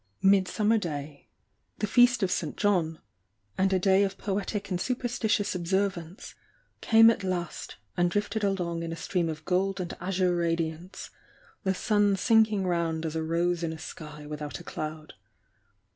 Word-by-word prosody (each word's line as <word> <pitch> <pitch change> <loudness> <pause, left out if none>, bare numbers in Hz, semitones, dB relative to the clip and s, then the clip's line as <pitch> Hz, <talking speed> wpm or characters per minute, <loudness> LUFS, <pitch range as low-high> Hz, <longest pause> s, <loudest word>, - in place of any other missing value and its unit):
Midsummer 200 +3 +3
Day, 145 -5 -6 0.5
the 210 - -1
Feast 245 +1 +4
of 185 - +1
St. 155 -5 -2
John, 175 -6 +1 0.6
and 190 +1 +2
a 190 - +3
day 190 +1 +4
of 195 -1 0
poetic 205 0 -3
and 180 -1 -1
superstitious 240 -4 0
observance, 180 -1 -2 0.5
came 225 0 +7
at 210 - -4
last 180 -2 -4 0.2
and 175 -1 +2
drifted 205 +3 -1
along 175 -4 -1
in 165 0 -4
a - - -3
stream 170 0 -1
of 155 -1 -6
gold 190 +2 0
and 175 -1 -4
azure 185 -1 +1
radiance, 165 +1 -3 0.5
the 190 0 +1
sun 205 -1 +2
sinking 215 -1 +3
round 165 -2 -1
as 160 0 -3
a 160 - 0
rose 170 +2 0
in 165 -1 -1
a 160 - -6
sky 150 -1 -9
without 150 0 -6
a - - -11
cloud. 155 0 -6
180 Hz, 160 wpm, -28 LUFS, 165-200 Hz, 0.6 s, came